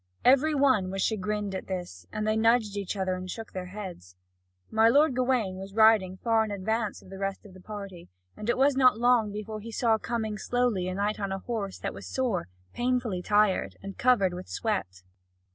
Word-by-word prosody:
Every 275 +4 +5
one 260 -9 +3
was 195 0 -2
chagrined 210 -1 -1
at 190 - -5
this, 175 - -6
and 215 0 -2
they 215 - +2
nudged 225 -2 +3
each 200 0 -3
other 190 -1 0
and 185 0 -5
shook 225 +3 -7
their 185 -1 -5
heads. 180 - -8 0.6
My 220 +1 +5
lord 285 +2 +4
Gawain 245 -7 +1
was 195 +1 -9
riding 220 -4 +5
far 225 +1 +2
in 220 - -4
advance 210 +2 -2
of 185 - -15
the 195 - -8
rest 195 +1 -3
of 200 - -13
the 185 - -13
party, 195 -4 -8 0.3
and 210 - -5
it 240 - +2
was 275 +1 +4
not 255 -4 +5
long 240 -3 +3
before 215 +1 -5
he 230 +2 -8
saw 225 -1 +2
coming 220 -2 -3
slowly 240 -6 0
a 185 - -3
knight 205 +2 -1
on 200 -1 -2
a 195 - -1
horse 200 -1 -4
that - - -4
was - - -9
sore, 240 -10 -1 0.3
painfully 245 -6 -1
tired, 205 0 +2
and 195 0 -7
covered 215 -8 +3
with 180 +1 -7
sweat. 95 - -3
210 Hz, 205 wpm, -28 LUFS, 190-230 Hz, 0.6 s, Every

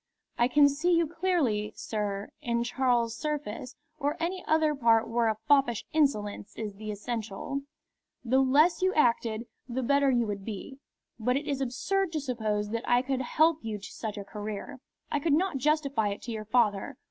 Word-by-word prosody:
"I 240 - +3
can 285 +2 +6
see 305 +6 +1
you 335 0 +3
clearly, 305 - 0
sir, 205 -2 -3
in 235 0 0
Charles 240 -2 +1
Surface, 280 -5 -4 0.2
or 290 0 -1
any 355 +3 -2
other 315 -1 +3
part 230 -5 +3
where 230 0 +1
a 220 -1 0
foppish 275 -6 +3
insolence 215 -10 0
is 215 -2 -4
the 215 +2 -8
essential. 220 +5 -4 0.6
The 260 +3 +3
less 290 +7 +4
you 375 +1 +2
acted, 235 -5 +2 0.2
the 255 +2 -2
better 280 +2 +3
you 240 -3 +2
would 200 -2 -4
be. 225 +6 -7 0.4
But 250 +4 +1
it 290 - -4
is 275 -2 -1
absurd 360 +9 0
to 310 - 0
suppose 215 -6 -2
that 230 0 -3
I 245 +1 +4
could 265 -1 -1
help 315 +5 +3
you 220 -2 -4
to 200 - -10
such 215 -2 -5
a 200 - -4
career. 210 +6 -6 0.3
I 295 - +1
could 295 +1 +1
not 345 -1 +2
justify 280 -5 +1
it 200 0 -4
to 240 - -5
your 215 -1 -5
father. 220 +2 +1
245 Hz, 180 wpm, -29 LUFS, 220-290 Hz, 0.6 s, can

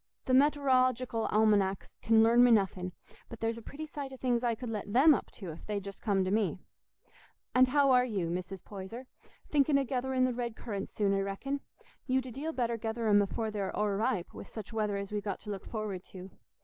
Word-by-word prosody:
Th' - - -12
met'orological 255 -4 +3
almanecks 205 -3 +2
can 225 0 +5
learn 235 +2 +6
me 245 - +6
nothing, 190 -4 +2 0.4
but 230 - -9
there's 225 0 -1
a - - -12
pretty 290 +7 -7
sight 290 -3 -6
o' 265 - -9
things 245 -2 0
I 235 -2 +1
could 235 +1 -6
let 210 -2 -4
them 275 +7 +7
up - - -2
to, 185 -6 -7
if 155 - -12
they'd 205 -2 -2
just 200 0 -9
come 195 -3 +1
to 185 - -1
me. 205 -6 +1 1.0
And 255 0 +6
how 280 +1 +4
are 250 -1 +6
you, 195 -9 -2
Mrs. 185 +1 -5
Poyser?—thinking 255 +7 -2
o' 275 - +1
getherin' 260 0 0
the 255 - 0
red 235 -2 -3
currants 200 -4 -6
soon, 200 -2 +2
I 195 - +1
reckon. 200 +9 -3 0.5
You'd 260 -1 +1
a 255 - -7
deal 290 +7 -4
better 235 -5 -1
gether 225 +1 -3
'em 205 -1 +6
afore 220 +2 -2
they're 200 -2 -2
o'erripe, 210 -1 0
wi' - - -8
such 220 0 -9
weather 210 -2 0
as 200 0 -5
we've 210 -1 -1
got 200 -2 -4
to 210 - -6
look 195 -1 -6
forward 210 -5 -4
to. 185 0 -10
225 Hz, 215 wpm, -31 LUFS, 200-255 Hz, 1.0 s, them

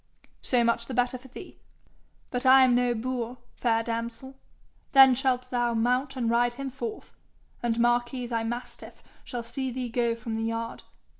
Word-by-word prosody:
'So 245 -2 +2
much 235 0 0
the 260 - -5
better 245 +1 +1
for 265 - -15
thee. 250 - -12 0.7
But 245 0 -1
I 260 0 +7
am 255 -1 +4
no 245 0 +2
boor, 245 +1 -3 0.2
fair 230 -2 +1
damsel. 230 +3 -5 0.6
Then 270 -1 +9
shalt 255 -1 0
thou 240 -1 0
mount 250 +4 +1
and 245 -3 -1
ride 240 +1 +2
him 275 0 -5
forth, 420 - -7 0.5
and 235 -1 0
Marquis 240 +1 +1
thy 230 -1 -2
mastiff 240 +2 -7 0.2
shall 240 -1 -5
see 260 +3 -4
thee 250 0 -4
go 235 0 0
from 230 -1 -5
the 225 - -2
yard. 230 0 -3
245 Hz, 170 wpm, -27 LUFS, 235-255 Hz, 0.7 s, Then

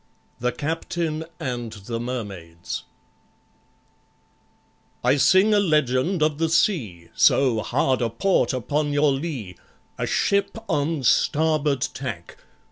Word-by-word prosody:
THE 125 +1 0
CAPTAIN 160 +1 -3
AND 120 -6 -4
THE 110 +3 -6
MERMAIDS 100 -9 -6 2.2
I 125 +3 +3
SING 190 +9 +5
a 205 - +5
legend 155 -1 +1
of 155 -1 0
the 165 -1 +1
sea, 110 - 0
So 125 -5 +3
hard 130 +3 0
a 120 - +1
port 185 - +1
upon 145 +4 -1
your 145 0 +3
lee! 135 - -4 0.4
A - - -1
ship 200 +2 +1
on 145 0 -1
starboard 150 +1 +2
tack! - - -6
140 Hz, 115 wpm, -23 LUFS, 120-160 Hz, 2.2 s, SING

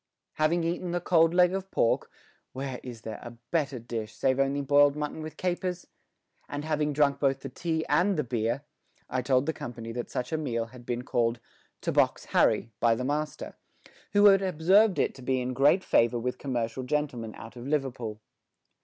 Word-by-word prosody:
Having 165 +3 +2
eaten 175 +1 -2
the 175 - +1
cold 165 -2 +4
leg 180 +1 +4
of 195 0 -4
pork 115 - +1 0.4
where 130 -1 -4
is 120 -3 -9
there 110 -1 -6
a 120 -1 -10
better 145 -5 0
dish, 115 -2 -5
save 130 0 +1
only 135 +1 +1
boiled 145 +1 +5
mutton 150 +1 -4
with 155 0 -8
capers? 180 0 -2 0.6
and 145 +1 -4
having 150 -1 0
drunk 140 -1 +2
both 135 -1 +1
the 135 - -6
tea 160 +4 -2
and 180 +6 +2
the 150 - +1
beer, 120 +2 -1 0.5
I 130 0 0
told 130 +1 +2
the 160 - 0
company 115 -4 -7
that 120 +1 -5
such 125 +3 -3
a 160 - 0
meal 115 -6 -1
had 120 +1 -14
been 120 0 -2
called 120 -1 0 0.4
"to - - -1
box - - +2
Harry" 115 - +3
by 115 -1 +4
the 125 +2 -3
master, 150 +1 -3 0.6
who 205 0 +5
had 195 -1 +7
observed 190 +3 +4
it - - +1
to 135 - -13
be 130 +1 0
in 125 0 -2
great 145 +9 +4
favour 120 +1 +3
with 125 +2 -3
commercial 120 -2 -2
gentlemen 125 -5 -2
out 115 +2 -11
of 120 +1 -8
Liverpool. 125 -7 -2
135 Hz, 190 wpm, -28 LUFS, 120-160 Hz, 0.6 s, had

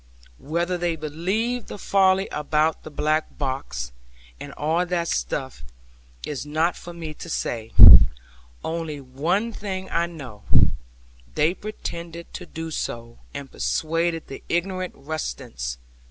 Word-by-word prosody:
Whether 170 +4 -1
they 170 -1 0
believed 190 +11 -1
the - - -7
folly 190 -1 +3
about 150 +1 +1
the - - -9
black 155 +1 0
box, 130 - -3 0.5
and 145 - -7
all 160 +5 +1
that 175 -1 -1
stuff, 130 - -2 0.6
is 145 -3 -4
not 155 +4 +1
for 175 - -9
me 165 -2 -6
to 170 - -9
say; 115 -7 -2 0.9
only 160 -3 -3
one 160 - 0
thing 190 -3 -5
I 170 0 +2
know, 135 -11 -9 0.9
they 160 +3 +3
pretended 170 -5 -7
to - - -7
do 160 0 -6
so, 115 -5 -4 0.2
and 140 -1 -6
persuaded 165 +1 0
the 135 - -8
ignorant 185 +1 -1
rustics. 60 - -4
160 Hz, 125 wpm, -24 LUFS, 145-175 Hz, 0.9 s, folly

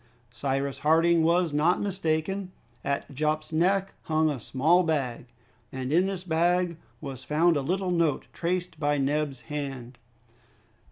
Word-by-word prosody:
Cyrus 135 +3 -2
Harding 165 +2 +4
was 170 0 +2
not 160 +5 +3
mistaken. 185 0 -1 0.3
At 140 0 -2
Jup's 155 +3 -1
neck 190 +4 +2
hung 155 -1 +2
a 140 - -4
small 155 - +3
bag, 135 -8 -1 0.4
and 130 +1 -3
in 180 +3 +4
this 190 -2 -4
bag 175 0 +1 0.2
was 135 -4 -7
found 165 +3 +3
a 145 - +1
little 185 +5 -1
note 170 -4 +1
traced 180 -1 -2
by 145 -1 +1
Neb's 140 -1 -1
hand. 135 -5 -6
155 Hz, 135 wpm, -27 LUFS, 140-175 Hz, 0.4 s, Harding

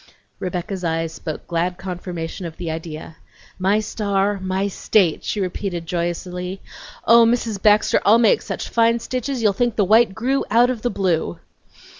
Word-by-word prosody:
Rebecca's 185 +1 -4
eyes 165 -1 -1
spoke 160 -1 -6
glad 175 +1 -1
confirmation 180 -2 -5
of 160 - -11
the 170 -2 -4
idea. 160 0 -7 0.4
"My 195 +3 +2
star, 200 -2 -1
my 190 +1 -1
state!" 190 -3 +1
she 210 - -2
repeated 180 -2 -3
joyously. 180 +2 -3 0.5
"Oh, 235 0 +7
Mrs. 230 -3 0
Baxter, 210 0 +4
I'll 215 +3 +6
make 230 -2 +4
such - - -5
fine 230 0 +3
stitches 255 +1 -3
you'll 210 -2 +4
think 240 +2 0
the 205 - +2
white 215 0 +4
grew 260 +5 0
out 240 +4 +4
of 240 -4 -5
the 245 - 0
blue!" 175 - -1
195 Hz, 160 wpm, -21 LUFS, 175-220 Hz, 0.5 s, Oh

